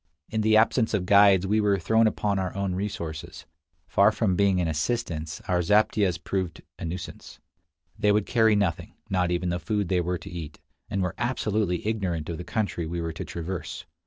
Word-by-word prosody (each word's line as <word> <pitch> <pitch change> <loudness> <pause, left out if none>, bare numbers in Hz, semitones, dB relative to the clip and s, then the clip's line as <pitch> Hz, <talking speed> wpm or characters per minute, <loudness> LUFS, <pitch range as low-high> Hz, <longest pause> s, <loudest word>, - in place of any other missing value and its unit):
In 110 - 0
the 110 0 +4
absence 110 0 +3
of 95 -3 -1
guides 100 -1 +6
we 105 +3 +2
were 100 -1 +3
thrown 110 +5 +3
upon 105 -2 0
our 95 -1 -3
own 100 -1 -1
resources. 85 -5 -5 0.4
Far 100 +2 +4
from 105 -4 0
being 100 -1 +3
an 85 - +1
assistance, 80 -2 -2
our 90 -1 +2
zaptiehs 105 -1 +2
proved 90 0 -3 0.2
a - - -5
nuisance. 85 +2 -7 0.6
They 105 -1 +4
would 105 -1 +2
carry 110 -3 +3
nothing, 95 -6 -1 0.2
not 90 -2 +1
even 90 +1 0
the 85 0 -1
food 100 +3 -1
they 90 -2 +2
were 90 +1 -1
to - - -10
eat, 80 -4 -7 0.3
and 100 -1 -1
were 90 - -2
absolutely 105 -7 -1
ignorant 95 -8 -2
of 85 - -4
the - - -5
country 100 -5 -2
we 85 +1 -3
were 80 -1 -3
to - - -5
traverse. 85 +1 -5
95 Hz, 190 wpm, -26 LUFS, 85-105 Hz, 0.6 s, guides